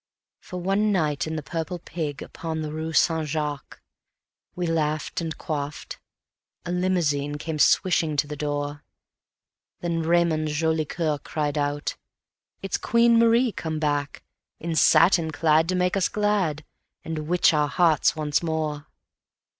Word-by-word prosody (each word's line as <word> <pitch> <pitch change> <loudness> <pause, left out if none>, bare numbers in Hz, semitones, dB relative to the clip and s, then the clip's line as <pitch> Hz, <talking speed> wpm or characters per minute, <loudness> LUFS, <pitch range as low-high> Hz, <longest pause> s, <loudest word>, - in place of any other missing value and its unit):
For 180 - -8
one 195 +4 +1
night 155 -6 0
in 160 - -3
the 155 - -4
Purple 165 +4 -4
Pig, 155 -4 -5
upon 160 -1 -5
the 150 - -4
rue 160 +1 -4
Saint 160 0 +2
Jacques, 150 -1 -4 0.8
We 180 - -2
laughed 155 -1 -1
and 160 -1 -4
quaffed... 145 -2 -5 0.7
a 175 - -3
limousine 165 -6 0
came 155 0 -4
swishing 165 -3 +3
to 145 - +2
the 150 0 -6
door; 145 0 -3 1.0
Then 170 -1 -1
Raymond 165 -1 +2
Jolicoeur 155 0 -1
cried 150 0 -3
out: 145 0 -2 0.7
"It's 195 - -1
Queen 235 0 +4
Marie 230 +1 +4
come 160 -5 -4
back, 145 -2 -2 0.4
In 165 0 -3
satin 165 0 +5
clad 160 +1 +2
to 185 - +1
make 180 +1 +1
us 195 -3 +1
glad, 195 -8 0 0.4
and 155 -2 -5
witch 175 0 +4
our 150 -1 +2
hearts 160 0 +3
once 150 -2 0
more." 155 -3 -3
160 Hz, 140 wpm, -25 LUFS, 150-175 Hz, 1.0 s, satin